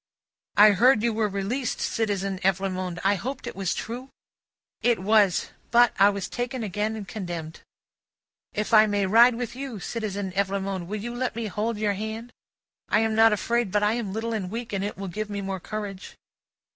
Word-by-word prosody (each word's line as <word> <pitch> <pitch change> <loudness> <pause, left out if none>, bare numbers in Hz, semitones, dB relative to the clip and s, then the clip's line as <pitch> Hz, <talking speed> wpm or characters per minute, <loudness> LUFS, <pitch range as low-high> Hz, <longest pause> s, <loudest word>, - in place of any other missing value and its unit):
"I 210 +1 +9
heard 230 +3 +4
you 235 -1 +2
were 215 0 +1
released, 205 +6 -2
Citizen 195 -3 -1
Evrémonde. 185 -1 -1
I 195 +1 +4
hoped 255 +7 -4
it - - -6
was 195 -2 -1
true?" 245 +4 -6 0.7
"It 240 -2 +3
was. 200 -1 +3 0.2
But, 240 0 +5
I 200 +1 +7
was 200 -2 -3
again 245 +1 -4
taken 210 +3 -2
and 210 -3 -7
condemned." 175 -6 -6 0.9
"If 210 +2 -3
I 215 0 +8
may 205 -1 +1
ride 230 +5 +6
with 240 0 -4
you, 260 -5 -6
Citizen 205 -2 -4
Evrémonde, 195 -1 -2
will 210 +3 -4
you 240 +1 -4
let 245 -1 -2
me 230 -1 -3
hold 215 +2 -2
your 210 -1 +1
hand? 220 +4 -6 0.6
I 215 - +3
am 225 0 +1
not 225 +1 +6
afraid, 230 +1 0
but 210 +1 +2
I 210 +1 +3
am 230 -4 -3
little 225 +3 -3
and 195 -5 -3
weak, 230 +1 -5
and 195 -1 -1
it 205 - -4
will 195 0 -5
give 210 +4 -4
me 205 -1 -3
more 195 -1 -3
courage." 205 0 -6
210 Hz, 190 wpm, -26 LUFS, 195-230 Hz, 0.9 s, I